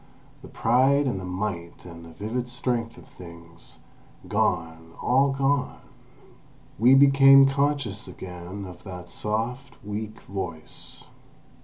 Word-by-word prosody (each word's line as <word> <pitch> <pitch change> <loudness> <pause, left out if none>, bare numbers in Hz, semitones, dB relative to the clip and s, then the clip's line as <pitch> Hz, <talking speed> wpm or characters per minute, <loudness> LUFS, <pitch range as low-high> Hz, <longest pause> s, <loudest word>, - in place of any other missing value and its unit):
The - - -11
pride 135 +5 +2
and 120 -8 -1
the 95 - -7
might 90 -2 -5
and 85 -1 -11
the 85 - -12
vivid 115 +8 -4
strength 120 -1 -2
of - - -15
things—gone, 85 -1 -6
all 135 +2 +3
gone! 135 0 0 1.0
We 125 +4 +6
became 135 0 +7
conscious 140 -7 -1
again 90 +2 -8
of 90 -2 -11
that 90 -3 -9
soft, 125 +5 -3
weak 105 +1 -5
voice. 90 -5 -7
105 Hz, 115 wpm, -25 LUFS, 90-135 Hz, 1.0 s, became